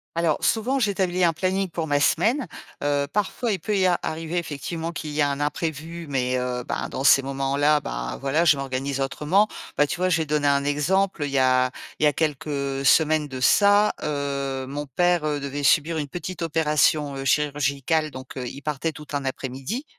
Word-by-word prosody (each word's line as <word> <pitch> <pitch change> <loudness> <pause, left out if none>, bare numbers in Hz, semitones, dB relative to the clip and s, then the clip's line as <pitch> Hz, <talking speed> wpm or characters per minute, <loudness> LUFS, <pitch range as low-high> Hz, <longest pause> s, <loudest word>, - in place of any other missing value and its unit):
Alors, 165 -2 0
souvent, 245 +5 +1
j'établis 190 -5 0
un 170 -1 +4
planning 190 +3 -1
pour 165 -1 -3
ma 145 -2 +1
semaine. 225 - +2 0.4
Heu, 145 0 +1
parfois, 210 +3 -1
il 195 - -1
peut 210 +5 -1
y 190 - +3
a 180 -2 +2
arriver, 160 +2 -4
effectivement, 165 +1 -5
qu'il 160 -3 -6
y 150 +1 0
a 145 - +3
un 140 0 -3
imprévu, 160 +2 -3
mais, 130 -2 0
heu, 125 0 -3
ben, - - -3
dans 135 - -4
ces 140 - +6
moments-là, 140 +2 +1
ben, - - -5
voilà, 140 +5 +1
je 150 -4 +5
m'organise 135 0 -3
autrement. 155 +9 +2 0.3
Bah, 145 - +5
tu - - -4
vois, 185 +1 +1
je 170 - +3
vais 160 - -1
donner 150 -1 0
un 140 0 +3
exemple. 155 +5 +1
Il - - -3
y 135 - 0
a 130 -1 +3 0.3
il - - -1
y - - +7
a 150 - +2
quelques 140 -3 -2
semaines 155 +1 +4
de 130 -2 -7
ça, 205 +9 +4
heu, 140 -2 -2
mon 145 +2 -5
père, 175 +4 +1
heu, 150 -1 -1
devait 140 +1 -4
subir 155 +3 +3
une 145 - -3
petite 175 +4 -6
opération, 150 -2 +1
heu, 135 - -5
chirurgicale, 145 +2 +1
donc, 130 -2 -10
heu, 125 -2 -4
il 140 - -8
partait 150 +2 -2
tout 150 -1 -11
un 140 -1 -2
après-midi. 135 - -4
150 Hz, 205 wpm, -24 LUFS, 140-170 Hz, 0.4 s, y